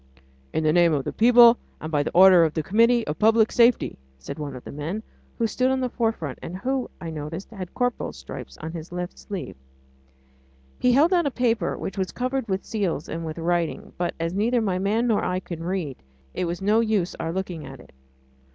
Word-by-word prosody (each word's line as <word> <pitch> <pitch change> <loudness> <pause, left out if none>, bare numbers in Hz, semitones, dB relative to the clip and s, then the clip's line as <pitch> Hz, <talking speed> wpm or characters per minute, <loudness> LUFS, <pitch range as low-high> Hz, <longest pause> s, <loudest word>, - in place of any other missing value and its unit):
"In 160 - -1
the 155 0 +3
name 170 -1 +4
of 140 -2 0
the - - -4
People 240 +1 +7 0.2
and 155 - -6
by 145 -2 +2
the - - -2
order 185 -1 +8
of 160 -2 0
the 160 - -1
Committee 230 +6 +3
of 150 - -4
Public 220 0 +4
Safety!" 235 - +3 0.2
said 65 - -8
one 145 -3 -5
of 125 - -9
the - - -8
men, 165 +9 -4 0.3
who 230 - +1
stood 255 +3 +1
in 265 0 +1
the 255 -2 -2
forefront, 225 - -2
and 180 - -6
who, 260 +5 -2
I 165 -2 -6
noticed, 160 +6 -6
had 190 -5 -6
a - - -33
corporal's 245 - -2
stripe 65 0 -8
on 160 - -5
his 165 0 -8
left 180 0 -5
sleeve. 195 -3 -6 1.2
He 250 - +3
held 310 +8 +4
out 345 -4 +3
a - - +2
paper, 230 -7 0
which 195 - -5
was 190 - -1
covered 255 0 -2
with 190 -1 -2
seals 190 -9 -2
and 165 +1 -5
with 160 0 -5
writing, 170 0 -1
but 175 - -1
as 165 +1 -2
neither 230 +5 +1
my 195 -5 0
man 210 +5 +1
nor 225 -4 +2
I 180 0 0
can 170 -3 -7
read, 170 -6 -3 0.4
it - - -2
was 175 +2 -4
no 210 +3 +4
use 215 -6 +1
our 165 - -2
looking 180 -3 -4
at 135 -1 -10
it. - - -16
190 Hz, 220 wpm, -24 LUFS, 165-230 Hz, 1.2 s, order